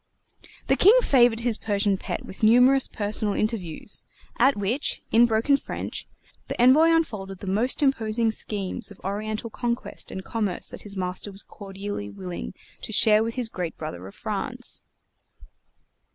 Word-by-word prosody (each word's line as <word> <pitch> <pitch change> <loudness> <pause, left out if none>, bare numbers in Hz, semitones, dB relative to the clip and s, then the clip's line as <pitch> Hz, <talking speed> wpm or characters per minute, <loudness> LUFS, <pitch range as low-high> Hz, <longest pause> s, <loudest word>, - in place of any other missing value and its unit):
The - - +3
King 425 +6 +7
favored 240 -4 +4
his 235 -2 0
Persian 205 -1 +1
pet 190 - -5
with 190 - -9
numerous 250 +4 +5
personal 210 0 -1
interviews, 210 -8 -3 0.4
at 270 -3 +4
which, 215 +8 -1
in 235 +2 +6
broken 230 +5 +3
French, - - -6 0.4
the - - -5
Envoy 260 +7 +6
unfolded 210 -13 0
the 200 - -9
most 220 +10 0
imposing 225 -4 +1
schemes 205 0 -2
of 205 - -14
Oriental 215 +3 -3
conquest 240 0 -3
and 190 - -7
commerce 210 -6 -2
that - - -9
his 200 -1 -9
master 185 +2 -3
was 195 +1 -6
cordially 195 - -7
willing 90 -10 -7 0.3
to - - -5
share 215 0 +6
with 230 0 -3
his 250 -3 -1
great 180 -6 -5
brother 95 - -6
of 100 - -12
France. - - -4
215 Hz, 150 wpm, -25 LUFS, 195-240 Hz, 0.4 s, King